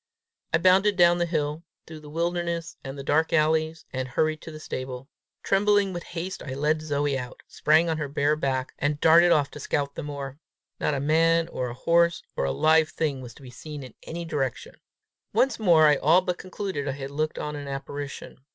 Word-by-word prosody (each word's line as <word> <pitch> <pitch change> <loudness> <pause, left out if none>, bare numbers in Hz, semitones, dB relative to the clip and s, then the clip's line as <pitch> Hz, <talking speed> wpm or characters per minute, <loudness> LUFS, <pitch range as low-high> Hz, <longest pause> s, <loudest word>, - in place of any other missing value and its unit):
I 160 - +4
bounded 190 +4 +4
down 175 -1 +5
the 175 - +1
hill, 155 -1 -2 0.2
through 160 -1 -10
the 150 -1 -12
wilderness 170 +1 -2
and 135 +1 -7
the 140 - -6
dark 155 +3 +1
alleys, 160 0 +1
and 130 0 -2
hurried 155 +4 0
to - - -9
the 155 - -9
stable. 130 -3 -6 0.4
Trembling 200 0 +2
with 175 - -4
haste 175 +2 -6
I 130 -2 -6
led 150 +3 +1
Zoe 145 -2 -1
out, 125 -1 -9
sprang 155 +3 +3
on 160 -1 -1
her 150 - -2
bare 145 +1 +1
back, 130 -3 -2
and 145 +1 0
darted 170 +2 +6
off 145 -3 +3
to - - -9
scout 140 -1 -2
the - - -5
moor. 140 -2 -6 0.4
Not 150 - 0
a - - -1
man 165 +3 +3
or 125 -1 -3
a 120 - -7
horse 170 +5 +2
or - - 0
a 70 - 0
live 155 - +3
thing 145 -5 -2
was 120 -2 -10
to - - -16
be 125 - -11
seen 145 +3 -8
in 130 - -11
any 170 +1 -6
direction! 135 -6 -3 0.6
Once 250 +4 +2
more 170 -7 +5
I 150 -2 +5
all 165 +7 +4
but 180 -1 -3
concluded 185 -6 -4
I 135 - -1
had 135 0 -7
looked 155 +2 -2
on 150 0 -4
an 145 -1 -7
apparition. 140 0 -6
155 Hz, 210 wpm, -26 LUFS, 140-170 Hz, 0.6 s, darted